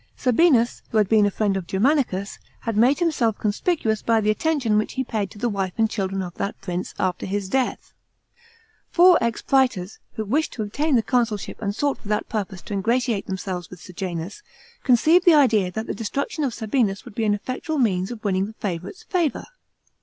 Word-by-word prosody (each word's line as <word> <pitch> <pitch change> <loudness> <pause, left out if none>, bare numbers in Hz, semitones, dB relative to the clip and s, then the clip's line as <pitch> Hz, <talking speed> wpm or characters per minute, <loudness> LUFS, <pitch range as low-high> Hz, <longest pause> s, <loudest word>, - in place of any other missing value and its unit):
Sabinus, 250 -2 +3
who 225 - -1
had 210 -2 +4
been 210 0 +4
a - - +2
friend 200 0 0
of 185 -3 -4
Germanicus, 200 -3 0 0.2
had 230 -2 -3
made 245 +6 +4
him 345 -2 +2
self 230 -7 0
conspicuous 220 - 0
by 230 -1 +2
the 215 0 +2
attention 255 -4 +1
which 215 - -3
he 260 - -1
paid 215 -5 -2
to - - -14
the 240 +4 -1
wife 195 -4 -2
and 220 -1 +2
children 195 -2 -2
of 175 -1 -7
that 200 - -3
prince, 180 -1 -4
after 185 -2 -1
his 200 0 -2
death. 260 +5 -1 1.0
Four 360 0 +6
ex 230 -1 -1
prators, 245 -8 +1
who 220 - -4
wished 290 +10 0
to 220 - -3
obtain 285 +8 0
the 230 - +3
consulship 230 -5 -1
and 205 -1 -2
sought 285 +2 0
for - - -13
that 210 0 -1
purpose 195 -4 -4
to - - -7
ingratiate 230 +2 0
themselves 185 -2 -4
with 180 - -11
Sejanus, 180 - -6 0.4
conceived 310 +8 +5
the 345 -4 +7
idea 225 -10 +4
that 220 +3 -4
the - - -3
destruction 280 +7 -3
of 270 - 0
Sabinus 220 -2 0
would 240 - -11
be 225 +1 -1
an 205 -1 +3
effectual 255 +8 -4
means 190 -8 +1
of 235 -2 -8
winning 195 -1 0
the 220 - -10
favourite's 190 - -5
favour. 345 -6 -1
220 Hz, 200 wpm, -23 LUFS, 195-255 Hz, 1.0 s, the